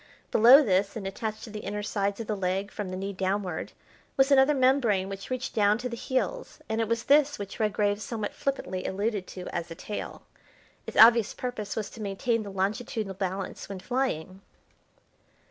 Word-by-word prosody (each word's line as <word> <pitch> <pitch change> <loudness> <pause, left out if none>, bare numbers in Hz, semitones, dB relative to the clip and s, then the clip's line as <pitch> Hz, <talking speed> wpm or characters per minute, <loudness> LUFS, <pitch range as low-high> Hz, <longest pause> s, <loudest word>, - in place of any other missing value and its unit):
Below 250 +7 +8
this 200 -2 +1
and 215 -4 -5
attached 215 +3 -4
to 220 - -8
the 210 - -6
inner 210 0 -4
sides 200 0 -1
of 230 - -4
the 215 - -2
leg 195 +1 -2
from 205 -3 -5
the 185 - -4
knee 195 +1 -4
downward, 190 -2 -2 0.5
was 270 +1 +4
another 275 +2 +5
membrane 255 -8 +2
which 195 -1 -7
reached 255 0 -3
down 210 0 +3
to 245 +2 -4
the 235 - -4
heels, 260 - -2
and 220 +1 -1
it 225 - 0
was 230 +1 -1
this 290 0 +4
which 200 +3 -7
Redgrave 210 -1 +1
somewhat 215 -1 -4
flippantly 190 -10 -3
alluded 200 0 -2
to 180 -1 -8
as 170 0 -4
a 165 - -7
tail. 210 - -6 0.6
Its - - -6
obvious 230 -1 +7
purpose 235 -5 -4
was 210 -2 -3
to 225 - -10
maintain 215 +3 -1
the 205 - -7
longitudinal 200 +2 -2
balance 190 0 -4
when 195 -2 -6
flying. 195 -7 -2
210 Hz, 185 wpm, -28 LUFS, 195-235 Hz, 0.6 s, Below